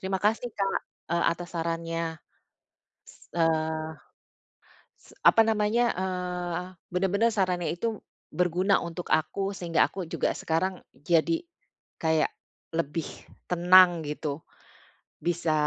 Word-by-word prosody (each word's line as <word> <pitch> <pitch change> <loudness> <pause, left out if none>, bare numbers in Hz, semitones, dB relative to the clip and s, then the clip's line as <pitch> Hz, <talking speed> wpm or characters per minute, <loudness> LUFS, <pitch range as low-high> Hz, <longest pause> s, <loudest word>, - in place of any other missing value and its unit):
Terima 190 0 -1
kasih 225 +3 +2
Kak, 195 -1 0 0.3
eee, 170 - +2
atas 175 +1 -3
sarannya. 165 -1 -2 1.2
Eee, 160 -1 0 1.0
s - - -21
apa 225 - +6
namanya? 225 +2 +2
Eee, 180 -1 -2 0.3
bener-bener 195 +5 +2
sarannya 180 -3 +1
itu 220 +4 -2 0.3
berguna 180 +3 +2
untuk 170 +1 -6
aku 195 +5 +1
sehingga 175 -4 +1
aku 185 -3 -5
juga - - 0
sekarang 180 +3 -1 0.2
jadi 170 - +1 0.6
kayak 160 -1 +2 0.5
lebih 165 0 -1 0.4
tenang 175 -1 +6
gitu. 150 0 -3 0.8
Bisa, 170 -2 0
175 Hz, 105 wpm, -27 LUFS, 165-190 Hz, 1.2 s, apa